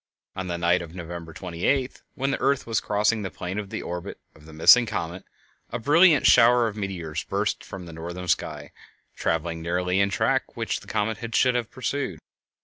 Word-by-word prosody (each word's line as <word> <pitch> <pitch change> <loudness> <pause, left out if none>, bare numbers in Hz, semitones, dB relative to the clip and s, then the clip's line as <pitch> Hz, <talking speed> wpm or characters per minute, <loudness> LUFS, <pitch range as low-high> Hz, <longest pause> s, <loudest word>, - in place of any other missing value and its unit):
On 95 -1 -4
the 85 -1 -2
night 85 +1 +2
of 85 0 -9
November 85 -2 -7
28th, 95 - -2
when 135 +1 -1
the - - -2
earth 140 0 +1
was 115 -2 0
crossing 105 +2 +1
the 95 - -3
plane 90 +3 -5
of 100 -2 -6
the - - -5
orbit 90 +2 -6 0.2
of 75 - -18
the - - -11
missing 115 +10 +6
comet, 90 -3 -4 0.5
a - - -2
brilliant 150 +5 +5
shower 120 0 +6
of 105 - -5
meteors 95 -7 -4
burst - - -1
from 95 -2 -8
the 85 - -10
northern 85 +3 -6
sky, - - -2 0.4
traveling 80 0 -1
nearly 90 +2 0
in 100 0 +3
the - - -6
track - - 0
which - - -2
the - - -16
comet 110 +1 -1 0.2
should 125 -1 +4
have 120 -2 -1
pursued. 130 - -3
95 Hz, 195 wpm, -25 LUFS, 85-115 Hz, 0.5 s, missing